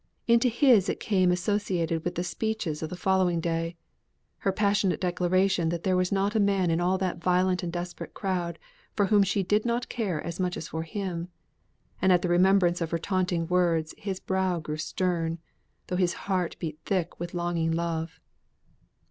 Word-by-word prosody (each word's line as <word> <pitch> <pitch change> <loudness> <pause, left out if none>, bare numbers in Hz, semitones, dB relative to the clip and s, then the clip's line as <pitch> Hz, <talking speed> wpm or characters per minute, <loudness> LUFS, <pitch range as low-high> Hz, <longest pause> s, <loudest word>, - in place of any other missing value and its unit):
Into 235 +1 +4
his 235 -5 +4
it - - -2
came 185 -4 +2
associated 180 -4 0
with 175 - -3
the 175 - -1
speeches 190 -4 -2
of 160 - -3
the 180 - -5
following 185 -2 +2
day; 165 0 -2 0.6
her 195 - +1
passionate 200 -1 +1
declaration 180 -1 +1
that 170 0 -3
there 185 -1 +2
was 180 0 +1
not 200 +1 +1
a 220 - +2
man 195 -4 +2
in 165 +1 +1
all 185 +2 +2
that 185 -2 -2
violent 180 +1 +2
and 175 - -3
a 175 - -3
desperate 175 0 -7
crowd, 180 -4 -2 0.4
for 205 - +3
whom 205 +1 +4
she 195 0 +1
did 210 +3 +2
not 240 +1 -1
care 200 -10 -2
as 170 +3 -5
much 180 -1 -1
as 155 - -6
for 160 - -3
him. 175 0 -4 0.7
And 190 - +4
at 180 -1 +4
the 180 - 0
remembrance 180 0 +4
of 165 - -1
her 170 - 0
taunting 180 -1 0
words, 170 -3 +1
his 195 -2 -4
brow 190 -2 0
grew 155 -1 -5
stern, 165 0 -1 0.5
though 180 - -2
his 180 -2 +2
heart 185 -4 0
beat 155 -2 -5
thick 185 -4 -2
with 175 +1 -5
longing 170 -2 0
love. 165 -1 -2
180 Hz, 190 wpm, -27 LUFS, 170-195 Hz, 0.7 s, Into